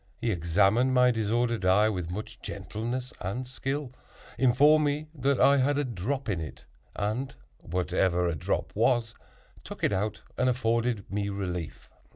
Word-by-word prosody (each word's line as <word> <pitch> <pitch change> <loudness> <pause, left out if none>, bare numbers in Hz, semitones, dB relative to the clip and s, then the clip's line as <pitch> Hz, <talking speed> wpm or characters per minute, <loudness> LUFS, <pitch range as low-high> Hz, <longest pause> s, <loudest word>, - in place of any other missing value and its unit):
He 115 - 0
examined 100 +9 +2
my 125 0 +5
disordered 115 0 0
eye 95 +4 +4
with 90 -6 -2
much 105 +5 -6
gentleness 120 +4 -5
and 120 +7 -3
skill, 135 +1 -4 0.4
informed 145 +4 +5
me 150 +1 -1
that 140 -2 0
I 140 0 +6
had 140 +2 +2
a 145 - +1
drop 130 +3 -3
in 95 -6 -1
it, 75 - -8 0.3
and 110 +6 -2 0.2
(whatever 90 0 0
a 85 - 0
"drop" 75 - -2
was) 115 0 +2 0.5
took - - -9
it - - +2
out, 105 +2 -2 0.2
and 125 0 +3
afforded 115 -3 0
me 100 0 -1
relief. 90 -4 -5
115 Hz, 155 wpm, -28 LUFS, 95-130 Hz, 0.5 s, I